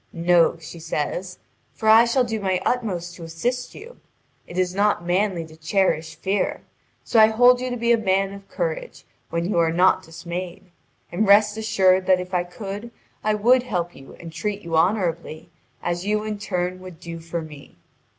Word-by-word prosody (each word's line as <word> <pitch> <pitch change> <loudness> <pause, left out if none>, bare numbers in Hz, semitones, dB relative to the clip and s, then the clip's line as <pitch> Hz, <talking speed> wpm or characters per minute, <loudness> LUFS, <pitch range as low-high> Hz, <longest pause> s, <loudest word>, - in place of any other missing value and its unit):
"No," 170 0 +3
she 165 +1 -10
says, 170 +3 -3 0.4
"for 220 - -3
I 225 +2 +8
shall 250 +2 +2
do 225 -2 -3
my 190 -2 0
utmost 185 -8 -1
to 170 - -10
assist 240 +10 -3
you. 475 +4 -12 0.5
It 175 - -9
is 180 -1 +1
not 200 -3 +1
manly 180 -1 0
to 160 0 -15
cherish 160 -1 0
fear. 200 +1 -1 0.4
So 230 - +2
I 215 - +9
hold 245 +3 +5
you 255 - -2
to 245 - -3
be 235 0 +1
a 235 - +4
man 195 -1 +1
of 200 0 -12
courage, - - -4 0.2
when 170 +1 -2
you 190 -3 +1
are 165 -1 +3
not 180 +3 +4
dismayed. 175 +3 -7 0.4
And 195 +5 0
rest 205 +1 +5
assured 190 -4 +2
that 185 -1 +5
if 180 +1 -7
I 180 -1 +2
could 200 +5 -7 0.3
I 215 0 +2
would 245 +5 +4
help 180 -8 -3
you 135 - -13
and 165 -1 -9
treat 205 +5 -3
you 165 -1 -3
honourably, 170 -3 0 0.3
as 175 0 -2
you 210 +1 0
in 215 -1 -4
turn 180 -2 -2
would 185 -3 -11
do 170 -1 -7
for 165 0 -5
me. 150 -2 -13
185 Hz, 190 wpm, -23 LUFS, 170-215 Hz, 0.5 s, I